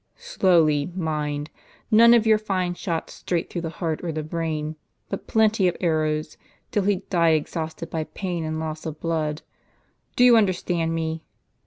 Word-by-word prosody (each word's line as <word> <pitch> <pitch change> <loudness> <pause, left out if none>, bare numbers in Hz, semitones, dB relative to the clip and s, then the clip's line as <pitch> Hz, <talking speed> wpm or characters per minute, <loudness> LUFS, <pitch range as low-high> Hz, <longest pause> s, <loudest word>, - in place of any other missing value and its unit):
Slowly, 170 - +2
mind; 150 -3 -2 0.4
none 235 +2 +8
of 230 -2 +3
your 220 -1 +5
fine 185 -4 -1
shots 170 -2 -4
straight 170 -2 -3
through 175 - -3
the 165 - -3
heart 160 -1 -3
or 170 - -2
the 155 0 -3
brain, 155 -1 -3 0.3
but - - -5
plenty 220 -3 +3
of 175 - -1
arrows, 155 -3 0 0.3
till 205 -2 0
he 205 0 +3 0.2
die 170 -3 +4
exhausted 160 +1 -5
by 160 -1 -2
pain 175 -2 -4
and 155 0 -3
loss 155 0 -5
of 155 -1 -6
blood. 160 -2 -2 0.7
Do 245 - +4
you 245 -2 +8
understand 175 -5 +1
me 160 0 -2
165 Hz, 165 wpm, -24 LUFS, 155-185 Hz, 0.7 s, none